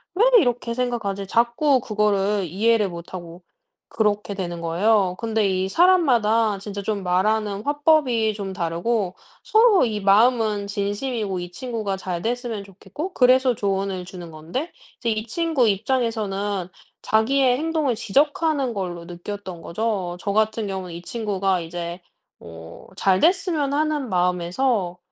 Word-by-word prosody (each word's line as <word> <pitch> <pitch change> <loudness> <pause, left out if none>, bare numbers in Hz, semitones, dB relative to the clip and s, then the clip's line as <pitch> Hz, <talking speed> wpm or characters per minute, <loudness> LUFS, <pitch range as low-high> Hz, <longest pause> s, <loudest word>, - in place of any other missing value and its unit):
'왜 435 - +4
이렇게 245 -4 0
생각하지?' 220 -6 -2
자꾸 240 +5 +2
그거를 210 -3 +1
이해를 210 +4 +2
못하고 170 0 -9 0.4
그렇게 210 -2 0
되는 175 -3 -5
거예요. 185 +3 +2
근데 220 -3 0
이 190 0 0
사람마다 230 - +3
진짜 200 0 -6
좀 200 -1 -3
말하는 200 +3 0
화법이 285 -7 +2
좀 200 -2 -5
다르고 180 +3 -1 0.3
서로 435 - +5
이 215 -2 -2
마음은 215 0 +3
진심이고 205 0 -2
이 175 0 -7
친구가 220 -4 -3
잘 180 -2 -4
됐으면 235 -3 -3
좋겠고 200 - -8
그래서 255 0 +4
조언을 195 -2 -2
주는 175 -2 -10
건데 170 - -5 0.3
이제 235 - -1
이 215 +1 -3
친구 305 -4 +1
입장에서는 205 -4 -1 0.4
자기의 250 +3 +3
행동을 310 -6 0
지적하는 280 +3 +1
걸로 175 -4 -5
느꼈던 180 +1 -7
거죠. 185 -1 -2
저 200 - -2
같은 220 +1 +1
경우는 190 -3 -5
이 170 - -7
친구가 195 -5 -1
이제 170 +1 -6 0.4
뭐 80 0 -12
잘 190 -1 +3
됐으면 330 -5 +2
하는 300 -4 0
마음에서 180 +2 0
210 Hz, 305 characters per minute, -23 LUFS, 185-245 Hz, 0.4 s, 서로